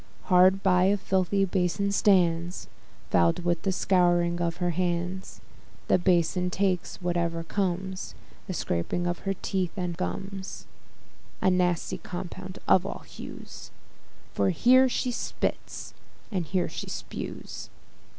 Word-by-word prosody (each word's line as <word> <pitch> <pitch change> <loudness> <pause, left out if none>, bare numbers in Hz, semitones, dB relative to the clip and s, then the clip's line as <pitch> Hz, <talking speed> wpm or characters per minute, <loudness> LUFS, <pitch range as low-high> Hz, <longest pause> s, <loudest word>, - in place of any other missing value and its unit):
Hard 185 +2 +6
by 180 -1 +4
a 200 +2 +3
filthy 190 +1 +1
bason 190 +2 0
stands, 175 -4 +2 0.4
Foul'd 85 - +3
with 175 -1 +1
the 195 - 0
scouring 175 -2 +2
of 170 -1 -1
her 175 -1 0
hands: 180 +2 -2 0.5
The - - +5
bason 180 0 +2
takes 185 -1 -1
whatever 170 -1 0
comes, 190 0 -2 0.3
The 185 - -3
scrapings 85 - -1
from - - -19
her 195 0 0
teeth 185 -3 -1
and 180 -2 -2
gums, 190 - -5 0.7
A 190 - +3
nasty 180 -2 +1
compound 185 +1 -7
of 185 - +5
all 195 - -6
hues, - - -9 0.6
For - - +2
here 255 +8 +5
she 250 0 -1
spits, - - -3 0.4
and 180 -6 -1
here 185 +1 +1
she - - -6
spues. - - -6
180 Hz, 130 wpm, -27 LUFS, 175-190 Hz, 0.7 s, Hard